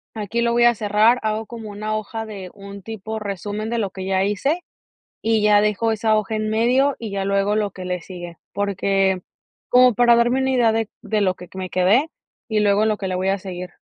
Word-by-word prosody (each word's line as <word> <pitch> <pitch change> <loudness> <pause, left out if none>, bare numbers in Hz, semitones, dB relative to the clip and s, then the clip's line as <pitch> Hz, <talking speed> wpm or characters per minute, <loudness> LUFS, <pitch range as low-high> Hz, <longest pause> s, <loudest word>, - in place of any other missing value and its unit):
aquí 220 +2 -2
lo 235 0 +1
voy 240 0 +4
a 240 0 +5
cerrar", 215 +3 +3
hago 215 +1 -1
como 225 -3 -8
una 215 +1 -3
hoja 225 +1 -5
de 195 -4 -8
un 200 -1 -11
tipo 220 +1 -6
resumen 205 +1 -4
de 235 - 0
lo 205 -3 -1
que 190 -1 -7
ya 190 0 +1
hice, 275 - 0 0.6
y 225 -1 +2
ya 210 -1 +5
dejo 210 +2 +1
esa 220 0 +2
hoja 215 +1 -1
en 215 0 -1
medio 250 +6 +2
y 225 -3 -6
ya 195 -1 -2
luego 200 +1 +1
lo 210 -1 0
que 185 -1 -8
le 180 -1 -3
sigue, 175 -2 -9 0.2
porque 195 -1 +1 0.5
como 250 -1 +6
para 240 +1 +5
darme 240 +3 +2
una 265 - +1
idea 240 -3 +3
de 225 -1 -1
de 215 -1 0
lo 185 -2 +1
que 180 - -12
me 185 -1 -5
quedé, 205 - +3 0.4
y 215 -1 +1
luego 205 +1 +3
lo 215 -1 +1
que 195 - -4
le 185 - -2
voy 185 +1 0
a 195 - +1
seguir. 180 -1 -7
210 Hz, 225 wpm, -21 LUFS, 195-225 Hz, 0.6 s, como